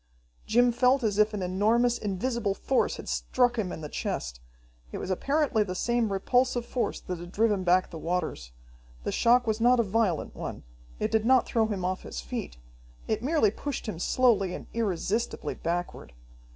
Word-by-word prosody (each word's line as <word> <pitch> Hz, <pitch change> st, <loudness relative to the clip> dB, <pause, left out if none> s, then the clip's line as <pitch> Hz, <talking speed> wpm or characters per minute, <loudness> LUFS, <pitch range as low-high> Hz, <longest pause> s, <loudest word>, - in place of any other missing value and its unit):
Jim 245 Hz, +2 st, +4 dB
felt 250 Hz, +2 st, +3 dB
as 210 Hz, -2 st, 0 dB
if 215 Hz, 0 st, +4 dB
an 205 Hz, -3 st, -3 dB
enormous, 220 Hz, +7 st, +2 dB
invisible 210 Hz, +1 st, -1 dB
force 265 Hz, +5 st, 0 dB
had -, -, -9 dB
struck 245 Hz, -2 st, +1 dB
him 185 Hz, -4 st, -1 dB
in -, -, -6 dB
the 150 Hz, -, -5 dB
chest. -, -, -4 dB, 0.5 s
It -, -, -5 dB
was 190 Hz, -, -4 dB
apparently 275 Hz, -, +1 dB
the 185 Hz, -3 st, -2 dB
same 235 Hz, +1 st, 0 dB
repulsive 245 Hz, +5 st, +1 dB
force 245 Hz, -, -2 dB
that 180 Hz, -2 st, -5 dB
had 175 Hz, +1 st, -9 dB
driven 210 Hz, -2 st, +1 dB
back 180 Hz, +1 st, +3 dB
the 165 Hz, -, -7 dB
waters. 160 Hz, -, -3 dB, 0.5 s
The -, -, -2 dB
shock 245 Hz, +1 st, +4 dB
was 220 Hz, 0 st, -1 dB
not 245 Hz, +1 st, +5 dB
a -, -, +4 dB
violent 205 Hz, -5 st, 0 dB
one. -, -, -6 dB, 0.4 s
It -, -, -1 dB
did 220 Hz, -1 st, +2 dB
not 255 Hz, +2 st, +4 dB
throw 225 Hz, -2 st, +1 dB
him 195 Hz, -4 st, -3 dB
off 185 Hz, 0 st, -2 dB
his -, -, -7 dB
feet. -, -, -6 dB, 0.5 s
It -, -, -1 dB
merely 270 Hz, -6 st, +2 dB
pushed 280 Hz, +2 st, -5 dB
him 180 Hz, -7 st, -4 dB
slowly 205 Hz, -4 st, +2 dB
and -, -, -8 dB
irresistibly 220 Hz, 0 st, -1 dB
backward. 170 Hz, -, -4 dB
215 Hz, 180 wpm, -28 LUFS, 185-240 Hz, 0.5 s, not